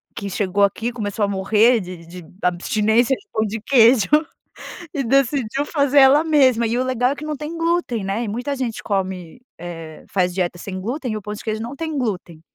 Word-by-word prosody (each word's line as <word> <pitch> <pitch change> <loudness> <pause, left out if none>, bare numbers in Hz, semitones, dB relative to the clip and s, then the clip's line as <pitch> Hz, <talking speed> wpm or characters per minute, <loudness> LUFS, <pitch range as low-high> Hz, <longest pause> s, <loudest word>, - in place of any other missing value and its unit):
que 200 -2 -5
chegou 200 +1 0
aqui, 225 +4 0
começou 210 -3 -2
a - - -2
morrer 210 +5 +3
de 180 -2 -9
de 175 0 -10 0.2
abstinência 215 +7 +2
de 410 - -21
pão 220 - 0 0.2
queijo 235 -4 +5 0.8
e 280 - -1
decidiu 270 +1 +1
fazer 285 -2 +2
ela 275 +3 +6
mesma. 260 -7 +3
E 230 +2 -1
o 255 - +1
legal 255 0 +1
é - - -2
que 295 - -9
não 305 -1 -3
tem 305 +3 -6
glúten 330 - 0
né, 200 +5 -2
e - - -4
muita 245 +7 -3
gente 250 -4 -4
come, 190 -1 -3 0.2
eh, 165 -2 -8
faz 180 -2 0
dieta 175 -1 -2
sem 190 0 -6
glúten 245 +3 -3
e - - -2
o - - -7
pão 210 +1 -6
de 210 - -9
queijo 220 -1 -3
não 240 +5 -6
tem 315 0 -4
glúten. 185 - -4
225 Hz, 205 wpm, -21 LUFS, 195-270 Hz, 0.8 s, ela